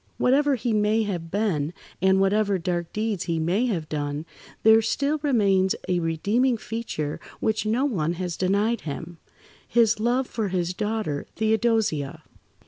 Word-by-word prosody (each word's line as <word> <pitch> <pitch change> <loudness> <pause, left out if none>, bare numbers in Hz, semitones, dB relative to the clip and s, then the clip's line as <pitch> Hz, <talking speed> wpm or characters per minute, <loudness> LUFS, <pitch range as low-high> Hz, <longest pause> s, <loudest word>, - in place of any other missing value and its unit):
Whatever 280 +2 +3
he 240 -1 -1
may 215 +1 +2
have 175 -5 -4
been, 175 -6 0 0.3
and 190 +1 +4
whatever 200 +1 +2
dark 175 -1 -2
deeds 210 -4 -2
he 170 -2 -1
may 180 +10 +1
have 170 -9 -2
done, 145 0 -3 0.4
there 220 0 +7
still 280 +7 0
remains 200 -9 +2
a 180 -1 +1
redeeming 205 +10 +1
feature 215 -11 -4 0.2
which 215 0 0
no 240 +6 +2
one 175 - 0
has 175 -1 -4
denied 205 +5 +1
him—his 175 +8 -2
love 245 +4 +1
for 220 -4 -3
his 180 -1 -1
daughter, 210 -7 -2
Theodosia. 220 -9 0
205 Hz, 140 wpm, -25 LUFS, 170-225 Hz, 0.4 s, there